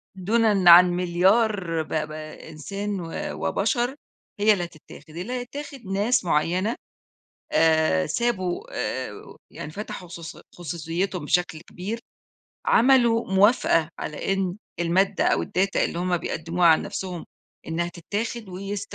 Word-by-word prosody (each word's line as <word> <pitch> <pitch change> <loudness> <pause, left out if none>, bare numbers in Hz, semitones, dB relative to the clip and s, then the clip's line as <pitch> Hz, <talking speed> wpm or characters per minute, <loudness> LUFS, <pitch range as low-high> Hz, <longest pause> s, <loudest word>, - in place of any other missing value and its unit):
دونًا 200 -1 +3
عن 180 +1 +9
مليار 180 0 +2
ب - - -16
ب 155 -1 -1 0.4
إنسان 195 +6 -4
و 165 -2 -6 0.4
وبشر، 245 0 0 0.4
هي 215 +1 +5
اللي 180 - -2
هتتاخد، 170 -1 -12
اللي 205 +8 -4
هيتاخد 270 +3 -6
ناس 200 +4 +1
معيّنة، 180 +7 +1 0.8
آآ، 160 - +3
سابوا، 185 -7 -1
آآ، 130 -6 -5
يعني 150 - -8
فتحوا 185 -1 -7
خصوصي 170 -1 -9
خصوصيتهم 170 +1 -3
بشكل 175 0 0
كبير، 195 +7 -6 0.7
عملوا 235 -4 +4
موافقة 190 -5 +4
على 150 +5 -3
إن 195 -1 -1 0.2
المادة 190 +4 +2
أو - - +2
الData 195 +2 -1
اللي - - 0
هُم 180 0 +1
بيقدموها 170 +1 -1
عن 160 - +5
نفْسُهم، 180 -3 -5 0.4
إنها 170 +1 -1
تتاخد 205 +6 -4
ويست 195 +2 -6
180 Hz, 125 wpm, -24 LUFS, 170-210 Hz, 0.8 s, عن